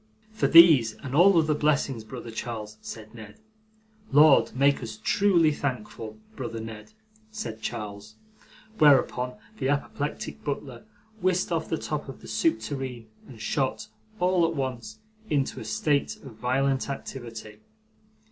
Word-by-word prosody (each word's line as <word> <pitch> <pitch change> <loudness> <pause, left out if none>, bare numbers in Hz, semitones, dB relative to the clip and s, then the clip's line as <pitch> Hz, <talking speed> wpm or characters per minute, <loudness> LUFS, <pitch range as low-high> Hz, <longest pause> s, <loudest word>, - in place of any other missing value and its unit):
'For 220 - 0
these 155 -10 +8
and 130 -2 -6
all 175 +5 +6
other 155 -2 +3
blessings, 140 -5 0
brother 120 0 -8
Charles,' 110 -2 -6
said 110 -1 -9
Ned. 110 -3 -11 0.7
'Lord, 145 0 +6
make 140 +2 +3
us 110 -1 -6
truly 180 -6 +3
thankful, 115 -6 -5 0.2
brother 120 -3 -5
Ned,' 110 - -9 0.4
said 215 - -6
Charles. 105 -2 -6 0.6
Whereupon 125 -4 +4 0.2
the 130 - 0
apoplectic 145 +1 -3
butler 135 -4 -5 0.4
whisked 185 0 +1
off 165 -1 -1
the 160 - 0
top 150 -2 -4
of 135 - -10
the - - -12
soup 110 +3 +1
tureen, 125 -2 -5 0.2
and 120 -5 -12
shot, 130 +3 -2 0.3
all 180 0 +3
at 165 - -4
once, 130 -4 -4 0.3
into 140 -3 0
a - - -7
state 140 +7 0
of 135 -4 -10
violent 130 +4 0
activity. 115 -6 -7
130 Hz, 140 wpm, -26 LUFS, 110-150 Hz, 0.7 s, these